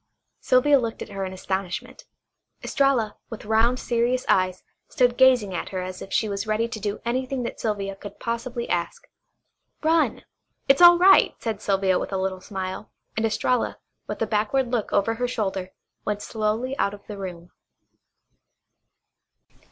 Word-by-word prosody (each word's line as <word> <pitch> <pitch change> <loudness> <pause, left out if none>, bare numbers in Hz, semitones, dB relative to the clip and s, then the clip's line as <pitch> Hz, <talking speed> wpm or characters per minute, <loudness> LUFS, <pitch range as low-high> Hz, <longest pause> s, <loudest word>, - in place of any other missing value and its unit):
Sylvia 275 +3 +4
looked 230 -2 -3
at - - -12
her 195 -1 -4
in 185 - -5
astonishment. 190 0 -4 0.6
Estralla, 270 -7 +1
with 225 - -8
round 225 +4 +2
serious 240 +1 0
eyes, 185 -1 +2 0.3
stood 245 -1 +2
gazing 250 -7 +4
at 175 - -4
her 190 - -4
as 185 0 -7
if 195 - -9
she 220 - +1
was 200 +1 -3
ready 215 +2 +1
to 225 - -5
do 205 0 -3
anything 255 +2 -1
that 235 - -5
Sylvia 200 -3 -2
could 205 +1 -11
possibly 235 +1 -3
ask. 175 - -3 0.8
"Run. 320 +1 +2 0.4
It's 275 +4 +5
all 345 0 +10
right," 380 +2 +6
said 220 -3 -3
Sylvia 195 -2 +2
with - - -5
a 195 - -1
little 190 0 -2
smile, 190 +1 -5 0.3
and 220 +1 +1
Estralla, 235 +3 0 0.3
with - - -5
a - - +1
backward 230 +4 0
look 235 -4 -1
over 215 +3 +2
her 245 +2 -2
shoulder, 195 -6 -2 0.3
went 210 -1 -2
slowly 220 +4 -1
out 200 - +1
of 205 - -19
the 205 -2 -8
room. 180 -2 -7
220 Hz, 160 wpm, -24 LUFS, 195-250 Hz, 0.8 s, all